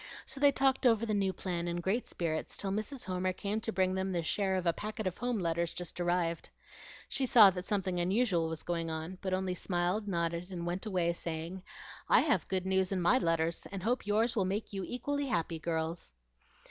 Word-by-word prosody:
So 270 - -7
they 285 0 +6
talked 265 -1 +3
over 230 -1 +3
the 215 - -1
new 195 -2 +2
plan 175 -1 -3
in 170 - -1
great 195 +8 -1
spirits 160 -2 -2
till 195 - -1
Mrs. 220 +6 -3
Homer 185 0 -1
came 205 +4 -2
to 225 - -2
bring 185 -2 +1
them 190 0 -1
their 170 -2 -1
share 190 +3 0
of 185 -1 -1
a 170 - +3
packet 215 +2 -5
of 185 -1 -2
home 245 -1 0
letters 170 -2 -1
just 175 0 -4
arrived. 175 -1 0 0.6
She 265 - 0
saw 220 -6 +8
that 180 0 -5
something 190 -3 -1
unusual 180 -2 +2
was 160 -1 -5
going 170 -1 -2
on, 160 +3 -5
but 190 - -2
only 185 0 0
smiled, 180 +3 -1
nodded, 170 -1 -1
and 175 -2 -5
went 180 +5 -3
away 175 -4 +1
saying, 170 +2 -5 0.5
"I - - +7
have - - +1
good 185 -1 -1
news 190 0 +1
in 190 - 0
MY 180 +9 +4
letters, 165 -2 0
and 195 -2 -5
hope 235 -1 0
yours 220 +3 +2
will 205 - +2
make 200 +3 -3
you 195 -1 -3
equally 285 +6 -2
happy, 165 -7 -1
girls." 160 - -3
185 Hz, 210 wpm, -32 LUFS, 170-210 Hz, 0.6 s, saw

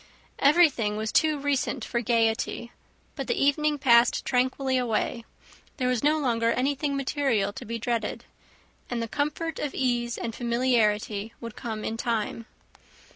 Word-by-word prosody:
Everything 280 -9 +4
was 220 0 -2
too 310 -2 +3
recent 280 -3 -1
for 235 - -1
gaiety, 230 0 0 0.4
but - - -5
the 465 -5 0
evening 295 +1 +2
passed 240 -3 +4
tranquilly 260 +1 +1
away; 235 -1 -1 0.5
there 255 -3 0
was 250 -2 +1
no 300 +2 +4
longer 230 -5 +1
anything 280 +2 0
material 260 -8 0
to - - -8
be 230 +2 -4
dreaded, 230 -2 -2 0.6
and 240 - -2
the 230 - -2
comfort 300 +5 -2
of 295 - -3
ease 240 -2 0
and 230 -1 -4
familiarity 230 -3 0
would 230 -2 -8
come 220 -2 -5
in 225 - -3
time. 230 -1 -2
245 Hz, 145 wpm, -26 LUFS, 230-280 Hz, 0.6 s, Everything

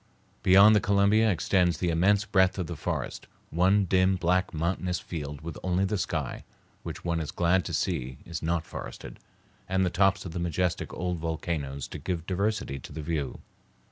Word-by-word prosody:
Beyond 100 +3 +7
the - - +5
Columbia 100 +3 +4
extends 90 -2 +2
the 90 -2 0
immense 100 +5 +3
breadth 95 -2 +3
of 90 - -1
the 85 - -5
forest, - - -4 0.2
one 95 +5 +3
dim, 95 +1 +3
black, 90 +1 +1
monotonous 90 +2 -1
field 75 -3 -6
with 80 0 -7
only 90 +1 +1
the 105 +2 -1
sky, - - -3 0.4
which - - -7
one 85 -1 0
is 80 -3 -4
glad 90 +1 +2
to - - -4
see 65 +1 -2
is 85 -2 -5
not 85 0 -1
forested, - - -8 0.5
and 95 0 +2
the 90 - 0
tops 95 +1 +2
of 85 - -5
the 90 - -4
majestic 85 +1 -1
old 90 -1 -3
volcanoes 80 -4 -3
to - - -7
give 85 -3 -3
diversity 95 -7 -1
to - - -11
the 75 +1 -6
view. 75 -3 -3
90 Hz, 180 wpm, -28 LUFS, 80-95 Hz, 0.5 s, Beyond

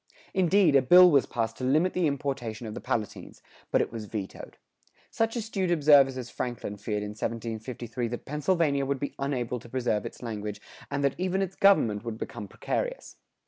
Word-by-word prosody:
Indeed, 185 -3 +4
a 135 - +7
bill 180 +7 +8
was 140 -3 +4
passed 115 -1 -2
to - - -7
limit 155 +8 +2
the 180 -3 +2
importation 135 -5 -3
of 110 - -5
the - - -7
Palatines, 110 -3 -4 0.3
but - - +3
it - - -7
was 115 -2 -6
vetoed.[109:3] 100 -2 -6 0.6
Such 225 +1 0
astute 210 -5 -2
observers 145 -5 +5
as 125 -2 -6
Franklin 120 -4 -4
feared 105 0 -3
in 105 - -4
1753 115 +2 -4
that 120 +1 -6
Pennsylvania 150 -1 +1
would 140 -1 -1
be 140 - -4
unable 125 -3 -2
to 120 - -14
preserve 120 -4 -1
its - - -12
language 105 -3 -5 0.3
and 140 - -2
that 140 -1 +2
even 190 +1 0
its 190 0 -5
government 115 - +4
would 115 -2 -5
become 105 -2 -6
precarious. - - -4
130 Hz, 185 wpm, -28 LUFS, 115-160 Hz, 0.6 s, bill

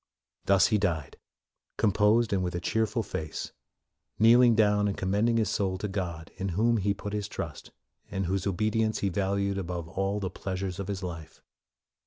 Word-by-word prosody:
Thus 95 -1 +5
he 105 -2 +2
died, 85 -8 -2 0.6
composed 105 +2 +3
and 95 - +1
with 90 -1 -3
a - - -1
cheerful 110 +4 0
face, 75 -6 -5 0.7
kneeling 120 +2 +6
down 105 -1 +3
and 100 - -2
com 95 0 -2
mending 115 +3 +2
his 110 -3 +1
soul 95 -3 0
to 105 - -3
God 90 -5 -4
in 95 +1 -2
whom 115 +2 +3
he 100 0 0
put 105 +1 -6
his 105 -1 -2
trust, - - -6 0.4
and 95 0 -2
whose 95 +2 -1
obedience 110 +3 0
he - - +2
valued 100 +1 0
above 85 -2 -4
all 95 +4 -1
the 95 -2 -3
pleasures 95 0 -4
of 100 - -4
his 100 -2 -4
life. 80 -3 -7
100 Hz, 180 wpm, -28 LUFS, 95-105 Hz, 0.7 s, kneeling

